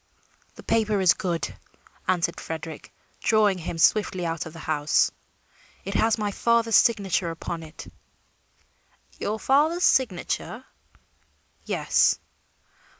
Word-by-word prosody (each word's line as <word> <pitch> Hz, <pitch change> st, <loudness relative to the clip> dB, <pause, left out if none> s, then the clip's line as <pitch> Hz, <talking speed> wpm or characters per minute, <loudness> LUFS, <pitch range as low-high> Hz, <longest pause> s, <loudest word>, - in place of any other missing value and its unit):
"The -, -, -12 dB
paper 215 Hz, -2 st, +1 dB
is 185 Hz, -2 st, +5 dB
good," 170 Hz, -6 st, -3 dB, 0.5 s
answered 175 Hz, -2 st, 0 dB
Frederick, 160 Hz, -1 st, -7 dB, 0.3 s
drawing 210 Hz, -4 st, +2 dB
him 165 Hz, 0 st, -5 dB
swiftly 185 Hz, 0 st, +2 dB
out 165 Hz, -1 st, -3 dB
of 160 Hz, -, -11 dB
the -, -, -11 dB
house. 150 Hz, -1 st, +2 dB, 0.7 s
"It 195 Hz, -, -4 dB
has 225 Hz, +2 st, +2 dB
my 210 Hz, -2 st, -2 dB
father's 230 Hz, +1 st, +2 dB
signature 195 Hz, -6 st, +3 dB
upon 165 Hz, 0 st, -5 dB
it." 155 Hz, 0 st, -10 dB, 1.3 s
"Your 215 Hz, +2 st, -2 dB
father's 310 Hz, +8 st, +2 dB
signature?" 230 Hz, +1 st, 0 dB, 1.0 s
"Yes." -, -, +2 dB
190 Hz, 110 wpm, -25 LUFS, 165-225 Hz, 1.3 s, is